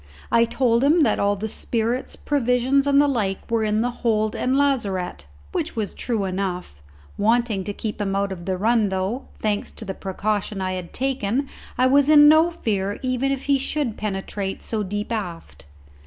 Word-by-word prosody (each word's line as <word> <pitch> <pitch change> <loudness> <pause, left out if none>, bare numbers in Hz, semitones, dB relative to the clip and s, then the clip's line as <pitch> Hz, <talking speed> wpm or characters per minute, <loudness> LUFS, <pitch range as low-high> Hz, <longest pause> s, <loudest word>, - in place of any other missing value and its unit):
I 230 0 +5
told 235 0 +1
him 310 +5 +4
that 225 - +2
all 200 0 +2
the 210 +2 -4
spirits, 230 +3 -2
provisions, 265 0 +1
and 280 0 +5
the 290 - +5
like 215 -6 -2
were 230 -1 +2
in 215 0 +1
the 245 +1 0
hold 215 -2 +1
and 260 +2 +1
lazarette, 200 - -1 0.2
which - - -3
was 215 -4 -2
true 225 -5 -2
enough, 185 - -3 0.5
wanting 225 -2 +2
to 205 - -2
keep 210 +1 -5
him 195 -1 -1
out 200 0 0
of 175 -2 -7
the 190 -1 -1
run, 220 +1 +2
though, 190 +7 -2 0.2
thanks 210 -1 0
to 220 - -7
the 190 - -4
precaution 200 +1 -2
I 185 0 -1
had 180 -2 -6
taken, 265 0 -1 0.3
I 255 - +4
was 280 +2 +4
in 295 -1 +8
no 315 +3 +6
fear 205 - -2
even 255 +1 0
if 275 -1 -2
he 280 -1 +2
should 270 -4 -2
penetrate 195 -1 -4
so 220 -2 -2
deep 205 +2 -4
aft. 180 - -5
220 Hz, 185 wpm, -23 LUFS, 195-255 Hz, 0.5 s, in